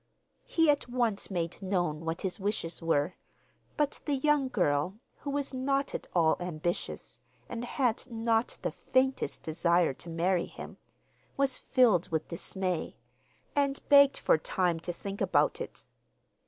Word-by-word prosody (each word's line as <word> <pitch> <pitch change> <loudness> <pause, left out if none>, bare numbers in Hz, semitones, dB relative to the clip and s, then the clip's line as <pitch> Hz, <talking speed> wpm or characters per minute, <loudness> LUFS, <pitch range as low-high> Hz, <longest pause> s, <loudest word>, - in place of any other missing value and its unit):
He 325 -1 +3
at 285 -4 -2
once 240 -5 0
made 175 -1 -3
known 175 -5 0
what 165 +1 -2
his 190 0 -3
wishes 195 -5 -2
were, 165 0 +1 0.6
but 295 -1 0
the 290 - +1
young 290 0 +2
girl, 180 - 0 0.2
who 285 - -5
was 280 -1 -2
not 275 +2 0
at - - -4
all 165 -2 +4
ambitious, 175 -1 -4 0.3
and 240 -1 -5
had 245 0 -1
not 225 0 0
the - - 0
faintest 265 +1 0
desire 170 0 +2
to 170 - -8
marry 170 +2 +1
him, - - -10 0.6
was 275 -2 +1
filled 230 - +3
with 160 -1 -2
dismay, 180 0 -2 0.6
and 280 -1 +1
begged 280 -1 +7
for - - +3
time 175 0 0
to 175 - -4
think 195 +3 -7
about - - +2
it. - - -7
195 Hz, 145 wpm, -30 LUFS, 170-260 Hz, 0.6 s, begged